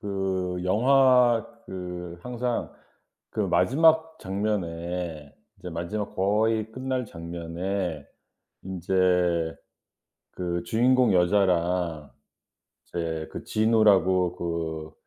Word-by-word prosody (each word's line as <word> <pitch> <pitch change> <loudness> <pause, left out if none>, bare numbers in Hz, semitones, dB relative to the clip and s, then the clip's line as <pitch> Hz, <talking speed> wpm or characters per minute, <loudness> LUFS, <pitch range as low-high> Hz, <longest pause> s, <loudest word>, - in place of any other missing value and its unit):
그 95 -2 -2
영화 125 +2 +4 0.2
그 90 -2 -7
항상 125 -1 -3 0.6
그 - - -3
마지막 160 +3 +3
장면에 90 -6 -3 0.3
이제 90 - -8
마지막 85 +5 -4
거의 110 +3 +1
끝날 130 0 -2
장면에 85 -1 -4 0.6
인제 90 -2 +1 0.8
그 85 -1 -3
주인공 125 0 +3
여자랑 90 -4 +1 0.8
이제 80 -2 -3
그 - - -6
진우라고 100 -5 +3
그 80 -2 -4
95 Hz, 165 characters per minute, -26 LUFS, 85-110 Hz, 0.8 s, 영화